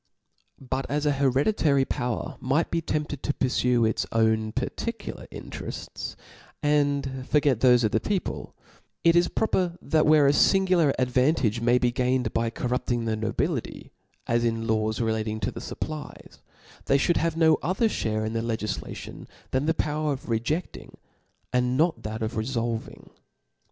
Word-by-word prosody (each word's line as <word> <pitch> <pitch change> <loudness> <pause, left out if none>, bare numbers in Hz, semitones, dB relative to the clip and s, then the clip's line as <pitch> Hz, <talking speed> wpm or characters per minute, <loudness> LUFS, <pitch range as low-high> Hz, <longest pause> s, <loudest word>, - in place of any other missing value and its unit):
But 135 0 -3
as 150 +1 -1
an 145 - +3
hereditary 140 - +2
power 125 -3 -3
might 140 +6 0
be 165 - 0
tempted 150 -3 -3
to 145 - -2
purfue 125 -2 +2
its 110 - 0
own 110 -1 +2
particular - - -4
interefts, - - -7 0.5
and 145 -1 +2
fofget 135 0 +1
thofc 125 0 +5
of 110 - +2
the 110 - +2
people; 190 - -3 0.5
it 170 0 +5
is 175 0 +5
proper 180 -5 0
that 155 -1 +1
whefe 150 -2 +6
a - - +6
lingular 185 -3 +4
ad 125 -1 0
vantage 125 -4 +2
may 120 +1 +4
be 125 -1 +2
gained 125 +1 0
by 115 0 +1
corrupting 120 0 -2
the 110 -1 0
nobility, 110 0 -3 0.3
as 115 0 +1
in 115 -1 0
the 110 - +2
laws 110 0 -1
relating 110 -1 -1
to - - -1
the - - -7
fAppties, 155 -1 -7 0.5
they 140 - +4
IhouM 170 +5 +2
have 165 -1 0
no 160 -1 +4
other 185 +7 +1
(hare 110 - -1
in 110 - -3
the 115 - -1
legiflation, 110 -3 -5 0.2
than 130 +3 0
the 160 - +2
power 150 -1 0
of 130 - -8
rejecking, 120 +10 -3 0.6
and 125 0 +1
not 165 +3 +2
that 110 +1 -4
of 110 +2 -3
refolving. 115 0 -3
130 Hz, 160 wpm, -26 LUFS, 115-150 Hz, 0.6 s, whefe